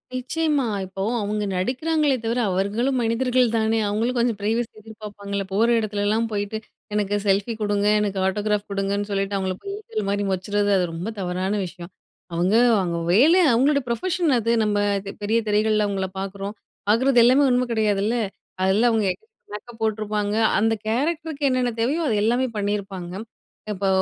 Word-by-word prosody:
நிச்சயமா, 290 +1 0 0.2
இப்போ 190 +1 -7 0.2
அவுங்க 210 0 -2
நடிக்கிறாங்களே 280 - +1
தவிர 235 +2 0
அவர்களும் 210 +8 0
மனிதர்கள் 250 +2 +2
தானே! 220 0 +1
அவுங்களும் 230 +5 -1
கொஞ்சம் 235 -3 +1
பிரைவசி 225 +3 0
எதிர்ப்பார்ப்பாங்கல்ல? 205 -2 -6
போற 225 +4 +3
எடத்துலலாம் 215 +1 0
போயிட்டு, 205 +1 -2 0.4
"எனக்கு 205 -1 0
செல்ஃபி 200 +3 +1
குடுங்க, 205 0 +1
எனக்கு 200 -2 -1
ஆட்டோகிராப் 205 +1 0
குடுங்க"ன்னு 200 +1 -1
சொல்லிட்டு 195 0 -1
அவுங்கள 190 -1 -2
போயி 395 - -5
ஈசல் 215 - -4
மாரி 205 0 0
மொச்சறது, 205 +2 0
அது 180 - +2
ரொம்ப 170 +5 -5
தவறான 185 +1 -2
விஷயம். 175 0 -10 0.4
அவுங்க 180 +5 +1 0.2
அவுங்க 170 -2 -1 0.2
வேலை, 320 - +6
அவுங்களோட 280 +4 +3
ப்ரொஃபஷன் 345 +6 0
அது. 230 +1 0
நம்ம 210 -1 +1 0.2
அது 195 0 -6
பெரிய 220 +3 +2
திரைகள்ள 215 0 +2
அவுங்கள 190 -1 -2
பாக்குறோம், 195 +2 -5 0.3
பாக்குறது 245 +3 +4
எல்லாமே 260 +4 +5
உண்மை 250 0 +2
கிடையாதுல்ல? 215 +1 +1 0.5
அதெல்லாம் 215 +6 +3
அவுங்க 215 -3 +1
எ - - -16 0.4
மேக்கப் 225 +2 -9
போட்டுருப்பாங்க, 210 -1 -1 0.2
அந்த 225 +1 +2
கேரக்டருக்கு 305 +5 -1
என்னென்ன 255 -1 +1
தேவையோ 290 +8 +1
அது 220 - +1
எல்லாமே 245 +3 +2
பண்ணிருப்பாங்க. 195 -3 -3 0.6
இப்போ 195 -1 -2
210 Hz, 150 wpm, -23 LUFS, 200-240 Hz, 0.6 s, வேலை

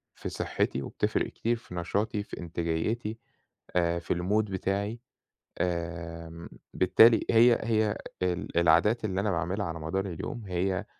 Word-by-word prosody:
في - - -5
صحتي، 65 - -1
وبتفرِّق - - -1
كتير 115 +1 -1
في 100 -5 -11
نشاطي، 100 +4 -1
في - - -9
إنتاجيتي، 85 +7 -2 0.6
آآ، 85 -1 +2
في 85 - -12
المود 100 +5 +1
بتاعي. 100 +4 -2 0.6
آمم، 85 -1 -4 0.2
بالتالي، 110 +5 +6
هي 115 +1 +6
هي 110 -1 +1 0.2
ال 90 -1 -1
العادات 85 +7 +4
اللي 95 -2 -1
أنا 105 0 0
باعملها 90 +4 -1
على 80 -2 -4
مدار 80 +5 -2
اليوم، 95 +5 -5
هي 95 0 -1
95 Hz, 135 wpm, -29 LUFS, 85-110 Hz, 0.6 s, بالتالي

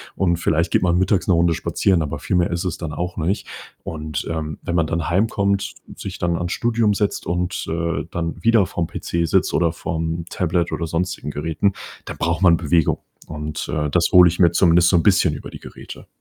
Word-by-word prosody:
und 85 -3 +1
vielleicht 85 0 0
geht - - +3
man 85 -1 +2
mittags 95 +1 +1
'ne 95 - +4
Runde 85 0 +3
spazieren, 90 +1 +1
aber 75 - -4
viel - - -2
mehr 85 - +2
ist 85 +2 -2
es 90 - -2
dann 80 -2 -5
auch 90 +2 -4
nicht. 85 +5 -1 0.4
Und, 75 -2 -5
ähm, 75 -2 -4
wenn 85 - -3
man 85 -2 +2
dann 80 0 -2
heimkommt, 100 +1 0 0.2
sich - - -7
dann 85 -1 0
ans 85 0 -2
Studium 115 -3 +1
setzt 105 -1 -1
und, 90 +1 -2
äh, 85 0 -2
dann 85 0 -4
wieder 115 -4 +4
vorm 85 -2 -3
PC 85 0 -2
sitzt - - +1
oder 85 0 +2
vorm 80 0 -3
Tablet 85 -1 -1
oder 85 - -2
sonstigen 85 -2 -3
Geräten, 80 +7 -1 0.3
dann - - -7
braucht 85 +1 -1
man 85 -3 +6
Bewegung. 80 -1 +1 0.3
Und, 75 -1 -5
äh, 75 -2 -1
das 85 +1 +2
hole 90 -1 +8
ich 85 0 -2
mir 85 -2 +5
zumindest 85 -1 +4
so 90 - +3
'n 85 - +1
bisschen 95 -6 +3
über - - -9
die - - -9
Geräte. - - -11
85 Hz, 210 wpm, -21 LUFS, 80-90 Hz, 0.4 s, hole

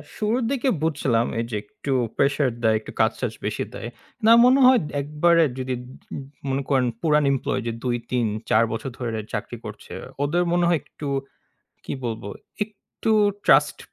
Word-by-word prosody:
শুরুর 225 +4 0
দিকে 270 -1 +1
বুঝছিলাম 135 -7 +1
এই 115 - -1
যে, - - -2
একটু 135 +6 -6 0.3
প্রেশার 140 0 +2
দেয়, 110 -1 +4
একটু - - -9
কাজটাজ - - 0
বেশি - - -1
দেয়। - - -6 0.4
না 225 - +7
মনে 260 +2 +6
হয় 255 -1 +7 0.2
একবারে 165 +4 +3 0.2
যদি 130 0 -2 0.8
মনে 135 +1 0
করেন 130 -3 +3
পুরান 150 -2 +3
এমপ্লয়ি 135 - -1 0.2
২ 120 -1 0
৩ 120 -2 +1 0.2
৪ 110 - +5
বছর 115 +4 -4
ধরে 115 -3 -2
চাকরি - - -4
করছে। - - -9 0.3
ওদের 170 +5 +2
মনে 175 0 +3
হয় 170 -2 +3
একটু 150 - -8 0.8
কি - - -5
বলব, 115 -3 -3 0.4
একটু 215 +1 -6 0.3
ট্রাস্ট - - +5
145 Hz, 155 wpm, -24 LUFS, 125-175 Hz, 0.8 s, না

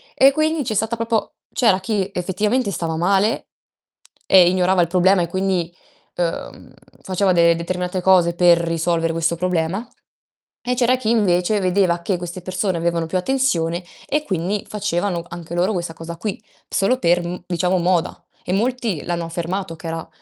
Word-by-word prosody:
e 270 +1 +6
quindi 310 +1 0
c'è 225 - -2
stata 220 +2 0
proprio 230 -1 -2 0.2
c'era 215 -7 +3
chi 200 -1 -1
effettivamente 205 +6 0
stava 165 -3 -3
male 195 - +1 0.8
e 180 -2 +6
ignorava 185 0 +2
il 170 - +2
problema 185 +1 +3
e - - -2
quindi, 185 -1 -1 0.4
ehm, 170 -1 -4 0.3
faceva 190 0 +1
de 170 -1 +5
determinate 180 +2 -3
cose 180 -2 +4
per 175 0 +5
risolvere 165 0 0
questo 165 +1 0
problema, 180 +4 -1 0.8
e 250 - 0
c'era 250 0 +3
chi 225 -3 -2
invece 205 -2 +2
vedeva 185 -2 +1
che 185 +1 -1
queste 175 +1 -7
persone 185 0 -2
avevano 170 0 0
più 185 - -1
attenzione, 180 -7 0 0.2
e 300 +2 0
quindi 195 - -2
facevano 195 -4 -2
anche 170 0 -7
loro 180 +5 +1
questa 170 -3 -3
cosa 165 +1 -8
qui, 210 +3 -4 0.3
solo 225 +7 +1
per 175 -4 +2
m 175 0 -5
diciamo 180 +1 +1
moda. 175 -1 0 0.2
E 180 - -2
molti 225 - -1
l'hanno 170 -1 -2
affermato 170 +1 -4
che 165 +1 -9
era 165 0 -5
180 Hz, 165 wpm, -20 LUFS, 170-205 Hz, 0.8 s, e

